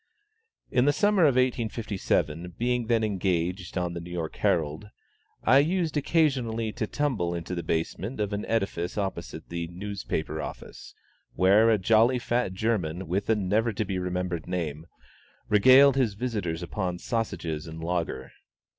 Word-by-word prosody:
In 125 0 +3
the 145 - +4
summer 200 +2 +3
of 140 -4 +4
1857, 105 - -1
being 120 -1 0
then 115 -1 +2
engaged 90 -3 -1
on 90 -1 -1
the 85 - -4
New 85 - -9
York 85 -2 -4
Herald, 80 +5 0 0.5
I 130 +4 +6
used 165 +1 +1
occasionally 130 -8 +1
to 110 0 -3
tumble 110 -14 -1
into 85 +1 -5
the 85 - -2
basement 85 +10 -3
of 105 -1 -1
an 100 - -2
edifice 95 -6 -1
opposite 85 -5 -4
the 85 -1 -3
newspaper 90 -4 -4
office, - - -9 0.4
where 100 +5 +5
a 110 - +4
jolly, 115 +5 +4
fat 120 -4 -1
German, 95 -4 -1
with 95 +6 -2
a 110 - +5
never 105 +3 +1
to 110 +1 -2
be 95 -1 -2
remembered 90 -2 -3
name, 80 -3 -3 0.6
regaled 130 +6 +7
his 120 -7 +1
visitors 100 -8 -3
upon 90 0 -3
sausages 85 -8 -3
and 80 0 -8
"lager." 85 0 -2
100 Hz, 150 wpm, -27 LUFS, 85-115 Hz, 0.6 s, regaled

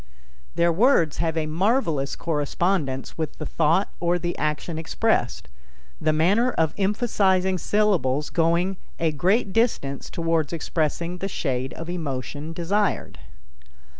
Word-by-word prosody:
Their 170 0 +3
words 180 - +3
have 165 -1 -1
a 160 - 0
marvelous 165 - 0
correspondence 150 -2 -1
with 160 - -3
the 155 - -5
thought 165 +6 +1
or 175 0 +1
the 175 0 -3
action 155 +2 -2
expressed, 160 - 0 0.5
the 155 - +3
manner 190 +11 +3
of 160 -2 +1
emphasizing 190 -3 +1
syllables 165 -10 +1
going 170 +3 +1 0.2
a 165 -1 +2
great 190 - +1
distance 220 - 0
toward 165 -2 0
expressing 170 +2 -2
the 195 - -2
shade 130 -8 -2
of 165 - -7
emotion 150 -2 -4
desired. 190 +5 -1
165 Hz, 125 wpm, -24 LUFS, 155-190 Hz, 0.5 s, Their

